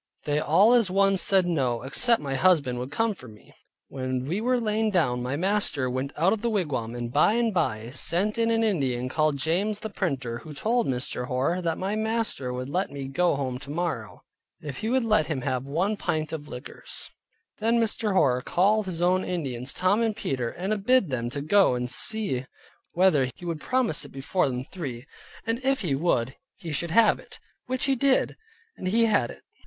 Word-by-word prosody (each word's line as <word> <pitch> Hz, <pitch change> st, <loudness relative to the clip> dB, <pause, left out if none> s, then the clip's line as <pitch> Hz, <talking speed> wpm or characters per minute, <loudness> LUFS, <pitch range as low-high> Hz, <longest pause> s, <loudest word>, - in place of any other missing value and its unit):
They 150 Hz, 0 st, 0 dB
all 190 Hz, +10 st, +5 dB
as 235 Hz, -6 st, +4 dB
one 195 Hz, +1 st, +3 dB
said 190 Hz, 0 st, +4 dB
no, 130 Hz, -9 st, 0 dB
except 230 Hz, -, +2 dB
my 135 Hz, -1 st, -3 dB
husband 140 Hz, -5 st, +3 dB
would 125 Hz, +2 st, -4 dB
come 225 Hz, +8 st, 0 dB
for 145 Hz, -9 st, -13 dB
me. 105 Hz, -2 st, -16 dB, 0.3 s
When 130 Hz, -1 st, -3 dB
we 180 Hz, +9 st, -2 dB
were 250 Hz, +1 st, +2 dB
lain 220 Hz, -1 st, 0 dB
down, 140 Hz, -11 st, +1 dB
my 125 Hz, +3 st, -2 dB
master 170 Hz, -7 st, 0 dB
went 130 Hz, +2 st, -2 dB
out 175 Hz, +6 st, +3 dB
of 220 Hz, -, -3 dB
the 235 Hz, -, 0 dB
wigwam, 145 Hz, -, -2 dB
and 120 Hz, 0 st, -5 dB
by 155 Hz, +8 st, +4 dB
and 235 Hz, -2 st, +1 dB
by 120 Hz, -10 st, -1 dB
sent 180 Hz, -, -1 dB
in 230 Hz, 0 st, +2 dB
an 225 Hz, 0 st, +2 dB
Indian 130 Hz, -, 0 dB
called 155 Hz, +1 st, +1 dB
James 195 Hz, +9 st, 0 dB
the 220 Hz, -, -5 dB
Printer, 135 Hz, -12 st, -2 dB
who 155 Hz, -2 st, -10 dB
told 230 Hz, -, +1 dB
Mr. 125 Hz, -1 st, -2 dB
Hoar, 135 Hz, +9 st, 0 dB
that 165 Hz, -2 st, -1 dB
my 195 Hz, +3 st, -2 dB
master 220 Hz, -, -1 dB
would 125 Hz, +1 st, -4 dB
let 180 Hz, +7 st, -1 dB
me 140 Hz, -1 st, -6 dB
go 175 Hz, +4 st, +1 dB
home 130 Hz, -2 st, -3 dB
tomorrow, 140 Hz, -, -4 dB, 0.4 s
if 145 Hz, -3 st, -7 dB
he 220 Hz, -, -2 dB
would 255 Hz, -1 st, +2 dB
let 215 Hz, -8 st, +3 dB
him 150 Hz, -5 st, -2 dB
have 125 Hz, +1 st, -2 dB
one 180 Hz, +9 st, 0 dB
pint 155 Hz, -6 st, -2 dB
of 150 Hz, -2 st, -5 dB
liquors. 125 Hz, -2 st, -7 dB, 0.5 s
Then 230 Hz, +2 st, +2 dB
Mr. 220 Hz, -2 st, 0 dB
Hoar 125 Hz, -9 st, +3 dB
called 200 Hz, +8 st, +2 dB
his 175 Hz, -2 st, -2 dB
own 185 Hz, +1 st, +3 dB
Indians, 135 Hz, -7 st, -3 dB
Tom 190 Hz, +5 st, +2 dB
and 225 Hz, -2 st, +1 dB
Peter, 130 Hz, -, -2 dB
and 195 Hz, -, -3 dB
bid 250 Hz, -, +3 dB
them 120 Hz, -2 st, -2 dB
go 150 Hz, +3 st, +3 dB
and 125 Hz, 0 st, -2 dB
see 135 Hz, -, -1 dB, 0.5 s
whether 165 Hz, -8 st, +3 dB
he 175 Hz, -, -11 dB
would 165 Hz, -3 st, -3 dB
promise 255 Hz, -, 0 dB
it -, -, -10 dB
before 135 Hz, +4 st, 0 dB
them 125 Hz, 0 st, -3 dB
three; 135 Hz, -6 st, -7 dB, 0.4 s
and 230 Hz, +3 st, -2 dB
if 270 Hz, -2 st, +1 dB
he 170 Hz, -8 st, -1 dB
would, 135 Hz, -4 st, +1 dB, 0.2 s
he 165 Hz, -, -7 dB
should 165 Hz, +3 st, -1 dB
have 220 Hz, +5 st, +4 dB
it; -, -, -13 dB, 0.3 s
which 255 Hz, 0 st, -1 dB
he 275 Hz, -, +2 dB
did, 265 Hz, +1 st, +2 dB, 0.4 s
and 185 Hz, -, -5 dB
he 230 Hz, +5 st, +3 dB
had 205 Hz, -, +2 dB
it. -, -, -11 dB
170 Hz, 200 wpm, -26 LUFS, 130-210 Hz, 0.5 s, all